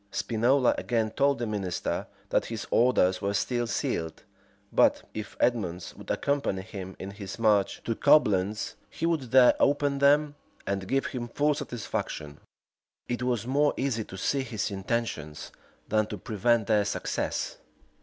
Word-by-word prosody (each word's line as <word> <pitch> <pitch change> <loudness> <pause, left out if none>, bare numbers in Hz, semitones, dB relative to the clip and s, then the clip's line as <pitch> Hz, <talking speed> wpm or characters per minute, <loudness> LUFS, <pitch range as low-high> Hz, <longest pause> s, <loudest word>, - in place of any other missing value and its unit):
Spinola 120 +5 +2
again 115 -3 0
told 140 +3 +2
the 120 - -2
minister 100 -5 -2 0.2
that - - +2
his 115 -2 -5
orders 95 -7 +3
were 100 0 -1
still 120 +3 0
sealed; 80 -7 -2 0.5
but, - - +4
if 105 -2 -7
Edmonds 95 -8 0
would - - -12
accompany 140 -10 0
him 95 -3 -8
in 95 - -6
his 100 0 -8
march 105 -4 +2
to 115 - -1
Coblentz, 110 -8 +3 0.2
he 165 - -4
would 160 -7 0
there 125 0 +7
open 145 0 +2
them, 145 +1 +4 0.3
and 95 -1 -2
give 135 +4 +1
him 120 -2 -4
full 145 +5 +1
satisfaction.[] 100 - -5 0.7
It 120 0 -2
was 120 -3 0
more 145 +3 +2
easy 130 -5 -1
to 95 - -9
see 135 +8 0
his 110 -5 -3
intentions, 95 -7 -3 0.4
than 110 0 +1
to 105 - -5
prevent 110 +3 +1
their 105 0 +3
success. - - -2
115 Hz, 150 wpm, -28 LUFS, 100-130 Hz, 0.7 s, there